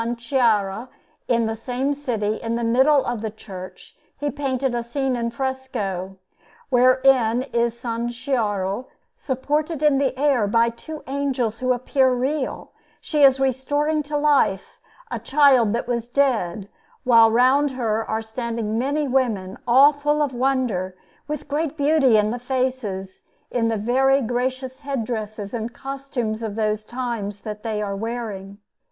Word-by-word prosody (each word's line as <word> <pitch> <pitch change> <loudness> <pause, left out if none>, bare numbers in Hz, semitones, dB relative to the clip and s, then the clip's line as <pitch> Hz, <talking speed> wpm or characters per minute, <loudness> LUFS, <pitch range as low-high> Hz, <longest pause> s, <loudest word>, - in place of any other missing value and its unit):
Chiara 230 -3 +1 0.4
in 235 -2 +2
the 220 - -1
same 250 +5 -2
city, 225 -7 -2
in 230 0 -3
the 235 - -2
middle 265 +5 +4
of 240 -3 -2
the 220 - -2
church, 190 -3 -11 0.2
he 290 0 -2
painted 270 -2 -1
a 240 - -1
scene 260 +2 -2
in 235 -1 -1
fresco, 230 -8 -4 0.5
wherein 255 -2 +4
is 235 -1 -2
S. 235 0 -2 0.2
Chiara 210 -4 -1 0.3
supported 300 - -2
in 290 -3 +4
the 270 -2 0
air 275 -7 +3
by 230 +3 +3
two 305 +7 -9
angels 265 -5 -1
who 255 0 +1
appear 260 +1 +2
real; 265 +3 -2 0.3
she 300 -2 -1
is 270 -1 +6
restoring 290 +4 0
to 295 0 -3
life 290 -10 +1 0.3
a - - -2
child 265 -6 +4
that 235 - -2
was 235 -1 -2
dead, 230 -8 0 0.4
while 230 -3 +6
round 260 +5 +4
her 225 -4 -1
are 220 +1 -1
standing 225 -1 -3
many 285 +3 0
women 225 -8 0
all 270 +5 +7
full 295 +1 +1
of 280 -3 -2
wonder, 245 -8 0 0.3
with 300 -1 -5
great 300 +1 -2
beauty 285 -5 +4
in 210 0 +2
the 245 - -3
faces 250 -7 -3 0.3
and 240 -2 0
in - - +3
the 225 -1 0
very 265 +5 +3
gracious 255 +1 -2
head 275 -5 -3
dresses 215 -3 -5
and 235 0 -4
costumes 270 -5 -4
of 220 -3 -4
those 215 -1 -1
times 225 -4 -4
that 210 -1 -6
they 215 -2 -2
are 200 -1 -3
wearing. 205 -3 -5
245 Hz, 155 wpm, -22 LUFS, 220-270 Hz, 0.5 s, all